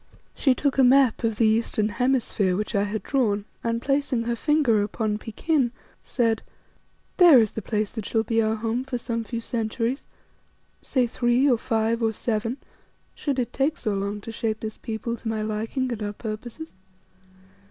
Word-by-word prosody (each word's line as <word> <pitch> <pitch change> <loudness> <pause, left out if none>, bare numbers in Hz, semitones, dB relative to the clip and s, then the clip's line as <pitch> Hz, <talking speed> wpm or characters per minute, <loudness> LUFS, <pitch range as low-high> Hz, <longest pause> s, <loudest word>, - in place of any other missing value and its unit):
She 265 -3 +2
took 280 +1 0
a - - +7
map 255 -2 +5
of 225 -1 +1
the 225 - +3
eastern 220 -1 +2
hemisphere 235 -6 +1
which 210 +4 -3
I 200 -1 +2
had 210 +1 -4
drawn 210 -7 0 0.2
and, 230 0 0
placing 275 -2 0
her 235 0 -1
finger 275 -5 +2
upon 210 +1 -1
Pekin, 250 +4 0 0.3
said 230 -3 0 0.8
"There 345 -7 +9
is 220 -3 +4
the 220 - -5
place 210 0 -1
that 220 -3 -5
shall 225 -1 +1
be 225 +1 +1
our 220 0 +1
home 225 +3 -2
for 265 -2 -3
some 230 -1 -3
few 230 +1 -4
centuries, 230 +3 -2 0.8
say 255 -2 +1
three, 240 +3 +2
or 245 -4 +3
five, 225 0 0
or 225 -1 +1
seven, 225 +3 -2 0.6
should 280 -3 -2
it 245 -3 -2
take 280 +4 +1
so 215 -3 -2
long 200 +1 -3
to 225 - -7
shape 225 -1 -2
this 215 -1 -6
people 225 +1 -4
to 230 - -8
my 220 -1 -1
liking 225 +5 -2
and 225 -2 -4
our 205 0 -3
purposes. 230 +8 -7
230 Hz, 180 wpm, -25 LUFS, 215-255 Hz, 0.8 s, There